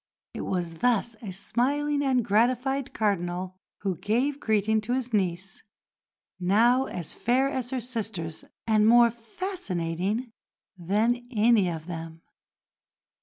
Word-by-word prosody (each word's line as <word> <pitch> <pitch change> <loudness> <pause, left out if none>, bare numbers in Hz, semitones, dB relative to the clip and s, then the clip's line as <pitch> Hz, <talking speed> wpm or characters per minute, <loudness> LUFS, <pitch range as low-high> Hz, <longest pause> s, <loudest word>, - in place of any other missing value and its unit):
It - - -5
was 170 -3 -3
thus 235 -1 +2
a 215 - -6
smiling 285 +9 0
and 260 -4 +2
gratified 250 +5 +1
Cardinal 185 -3 -1 0.3
who 190 -4 -1
gave 260 - 0
greeting 220 -1 +1
to 230 +3 -2
his 250 -2 -2
niece, 190 -1 -1 0.8
now 230 +8 +4
as 175 -4 -5
fair 255 +3 +2
as 260 -3 -3
her 255 -1 -2
sisters 220 -9 -4 0.2
and 215 -1 +4
more 235 0 +7
fascinating 230 - -3 0.4
than 220 +7 0
any 220 -4 +3
of 160 -2 -5
them. 165 -1 -7
220 Hz, 125 wpm, -27 LUFS, 185-250 Hz, 0.8 s, more